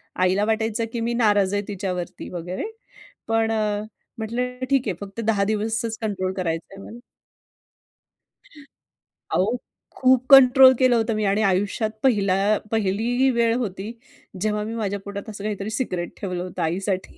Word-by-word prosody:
आईला 185 +3 +2
वाटायचं 220 +1 0
की 235 - -2
मी 235 +1 -1
नाराज 205 -4 +2
आहे 205 - +1
तिच्यावरती 180 -3 -5
वगैरे. 180 - -5 0.6
पण 225 0 +1
अ, 210 -2 0 0.4
म्हटलं, 250 +3 -3
"ठीक 270 -4 +2
आहे 190 - -1
फक्त 200 +2 -8
10 210 -3 +2
दिवसचं 220 +2 -1 0.2
कंट्रोल 190 -2 -2
करायचं 165 0 -3
आहे 195 0 -11
मला." 235 +2 -10 2.4
अहो, 220 +6 +1 0.4
खूप 255 -1 +4
कंट्रोल 265 0 +9
केलं 255 -2 +4
होतं 225 -1 +1
मी. 215 - -1
आणि 200 +2 +2
आयुष्यात 200 +3 +1
पहिला 205 -8 +3 0.4
पहिली 225 +5 +1
वेळ 235 -1 +2
होती, 205 -3 -4 0.5
जेव्हा 210 0 0
मी 220 +2 -5
माझ्या 205 -3 -2
पोटात 200 +2 -6
असं 205 -1 -8
काहीतरी 210 -1 -3
सिक्रेट 185 -7 -3
ठेवलं 180 -2 -3
होतं 185 - -6
आईसाठी. 185 +3 -2
210 Hz, 145 wpm, -23 LUFS, 195-230 Hz, 2.4 s, कंट्रोल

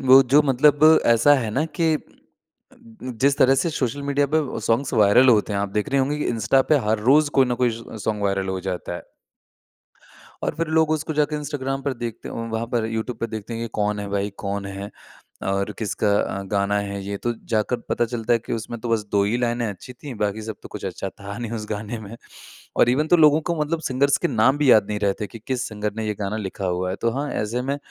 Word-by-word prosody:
वो 135 +1 +9
जो 150 +1 +7
मतलब 145 +2 +3 0.2
ऐसा 115 +5 +5
है 115 -6 -1
ना 135 +8 0
कि 165 -2 +3
अ, - - 0 1.2
जिस 140 +1 +3
तरह 135 +1 +5
से 170 - -1
सोशल 140 -1 -2
मीडिया 140 0 +1
पे 160 - +5 0.2
सॉन्ग्स 115 +5 0
वायरल 110 +5 +5
होते 105 -2 +4
हैं, 100 - 0
आप 100 - -1
देख 105 - -1
रहे 135 0 +3
होंगे 145 +3 0
कि - - -2
इंस्टा 115 +4 +2
पे - - +7
हर 110 - +2
रोज़ 150 +1 +5
कोई 130 - +5
ना 120 - 0
कोई 120 - +3
ज़ - - -10 0.2
सोंग 105 -2 -1
वायरल 100 -1 0
हो 95 0 -2
जाता 90 -1 -4
है। - - -9 1.4
और - - -1
फ़िर 165 - -2
लोग 160 -1 +4
उसको 155 0 -1
जाके 150 0 +1
इंस्टाग्राम 135 -2 -3
पर 140 - -1
देखते 120 -1 -6
वहाँ 115 0 -3
पर 120 -2 0
यूट्यूब 115 +1 -4
पे 115 - -1
देखते 110 0 -6
हैं 115 - -4
ये 115 - -3
कौन 105 0 0
है 100 - -4
भाई, 100 0 -1
कौन 100 0 -3
है, 100 +1 -6 0.5
और 100 +1 -1
किसका 105 -1 -1
अ, 100 - -3
गाना 100 +1 0
है 100 -1 -4
ये 100 +1 -3
तो 120 +4 -2 0.2
जाकर 110 +3 +1
पता 120 - +1
चलता 115 0 -2
है 120 - +4
कि 115 - -8
उसमें 115 +1 -4
तो 120 - -5
बस 115 -2 +1
2 100 - +4
ही 105 +4 0
लाइनें 120 -1 0
अच्छी 105 +4 -7
थीं, 130 +2 -9
बाकी 105 +1 -2
सब 110 -1 -6
तो - - -10
कुछ - - -8
अच्छा - - -4
था 100 0 -9
नहीं 120 -2 -5
उस 110 -2 -4
गाने 105 +2 -4
में। 110 +2 -9 0.6
और - - +5
इवन 145 +5 +1
तो 175 - +6
लोगों 155 -1 +5
को 170 - +1
मतलब 155 +2 -1
सिंगर्स 140 +2 +2
के - - 0
नाम 130 +3 +3
भी 145 -3 +4
याद 105 -4 +6
नहीं 105 -1 -2
रहे 100 -1 +2
थे 105 - -2
कि 115 - -11
किस 130 -1 -1
सिंगर 105 -1 -3
ने 110 -1 -3
ये 105 - -1
गाना 100 +1 -2
लिखा 100 -2 -4
हुआ 90 0 -1
है 95 - -3
तो 115 - +2
हाँ 140 +4 -2
ऐसे 115 +4 -2
में 140 +2 -1
115 Hz, 245 wpm, -23 LUFS, 105-135 Hz, 1.4 s, वो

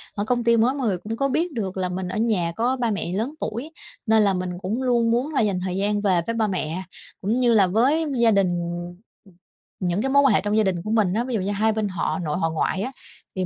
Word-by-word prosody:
ở 205 - -1
công 240 +1 0
ty 235 0 +4
mới 240 +4 +3
mọi 265 -5 -2
người 190 - 0
cũng 215 +5 -5
có 275 - +1
biết 335 +6 0
được 195 -6 -4
là 185 -1 -1
mình 180 +1 -4
ở 180 - -4
nhà 210 -7 +1
có 245 +3 +1
ba 240 -3 -1
mẹ 200 -4 -3
lớn 225 +9 -2
tuổi. 240 +7 -4 0.3
Nên 220 -1 +4
là 200 - +3
mình 180 -1 -3
cũng 215 +7 -2
luôn 235 -2 +2
muốn 255 +6 0
là 275 - +2
dành 200 -4 0
thời 185 -1 -2
gian 205 +1 0
về 185 -4 +2
với 230 - -1
ba 220 -1 +1
mẹ, 185 -2 -3 0.4
cũng 220 +6 0
như 240 -2 +4
là 200 -4 +5
với 260 - +2
gia 230 -1 +5
đình. 200 -2 +3 1.3
Những 180 +2 -1
cái 265 - 0
mối 280 +1 +5
quan 270 - +5
hệ - - +3
trong 210 +1 0
gia 220 - +4
đình 185 -4 -1
của 215 - -4
mình 210 -5 +2
á, 230 +4 0
ví 255 - -4
dụ 215 - 0
như 195 +2 -2
hai 215 +2 +1
bên 215 -1 -1
họ 185 +1 -2
nội 155 -2 -2
họ 165 -3 0
ngoại 160 +4 -1
á, 255 - -3 0.4
thì 185 -1 -1
215 Hz, 270 wpm, -23 LUFS, 185-235 Hz, 1.3 s, là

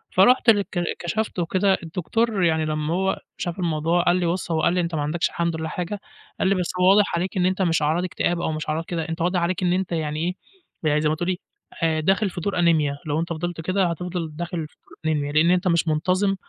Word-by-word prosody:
فرُحت 240 +6 +5
للك 205 -3 +4
ك 175 - -1 0.2
كَشَفت 210 +3 -2
وكده، 190 +3 +2
الدكتور 190 +5 -1
يعني 160 -2 +2
لمّا 155 +1 -1
هو 190 +2 0 0.2
شاف 175 +2 -4
الموضوع، 165 0 +1
قال 175 - +3
لي 180 -1 0
بُصّ 170 +1 -1
هو 160 -1 +1
قال 170 - +3
لي: 180 - +2
"أنت 170 -1 -2
ما 150 - -1
عندكش 155 +4 0
الحمد 170 -1 -1
لله 160 0 -3
حاجة." 180 +5 -4 0.4
قال - - +2
لي 195 - +3
بس 180 -2 -1
هو 180 +1 +5
واضح 200 -1 +4
عليك 185 +4 -2
إن 180 - +2
أنت 185 +1 +1
مش 165 -3 +2
أعراض 155 +4 +1
إكتئاب 175 -1 -1
أو - - -1
مش 155 0 -4
أعراض 160 +2 -1
كده، 165 -2 -3
أنت 165 +1 -4
واضح 180 +2 +1
عليك 185 +2 -1
إن 175 -1 +3
أنت 185 0 -1
يعني 155 -2 -2
إيه، 175 +3 -1 0.5
يعني 150 +1 +2
زي 150 - +2
ما 155 - +1
تقولي 175 +3 -2 0.4
آآ، 160 -1 +2
داخل 195 +5 +2
في 175 - -6
دور 195 +1 -1
أنيميا، 155 -5 +3
لو 150 +1 0
أنت 170 - -2
فضلت 170 +1 -4
كده 185 +3 +1
هتفضل 170 -1 -3
داخل 170 -1 -4
في - - -30 0.3
الأنيميا، 150 -2 0
لأن 155 +3 +4
أنت 180 +1 +2
مش 170 -1 +2
منتظِم 185 +6 +1
175 Hz, 240 wpm, -23 LUFS, 160-185 Hz, 0.5 s, فرُحت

